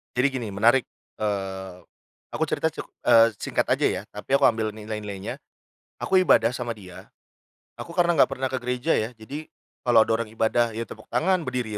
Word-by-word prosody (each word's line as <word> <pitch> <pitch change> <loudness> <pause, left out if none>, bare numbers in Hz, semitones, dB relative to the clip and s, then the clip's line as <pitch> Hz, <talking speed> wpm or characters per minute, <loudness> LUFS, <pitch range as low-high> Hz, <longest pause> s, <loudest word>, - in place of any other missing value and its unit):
Jadi 125 +3 +3
gini 130 -4 -4
menarik. 115 +6 +4 0.4
Eee, 95 -3 -3 0.6
aku - - 0
cerita - - 0
cek - - -5 0.2
eee, 115 0 +8
singkat - - 0
aja - - 0
ya, 90 - -2
tapi 105 +6 -1
aku - - +2
ambil 110 -2 0
nilai-nilainya. 105 -2 -6 0.6
Aku 190 - +4
ibadah 120 -10 +4
sama 120 -2 -4
dia, 95 -4 -12 0.7
aku 170 - -8
karena 175 -2 +2
enggak - - +5
pernah 130 0 -2
ke 130 - -2
gereja 125 +5 0
ya, 110 +2 -1
jadi 140 +8 -8 0.4
kalau 120 -2 +6
ada 110 - +1
orang 115 -2 -4
ibadah, 115 +1 +1
ya 115 - -4
tepuk 110 -1 -9
tangan, 180 0 +2
berdiri, 125 -4 -3
115 Hz, 180 wpm, -25 LUFS, 105-130 Hz, 0.7 s, eee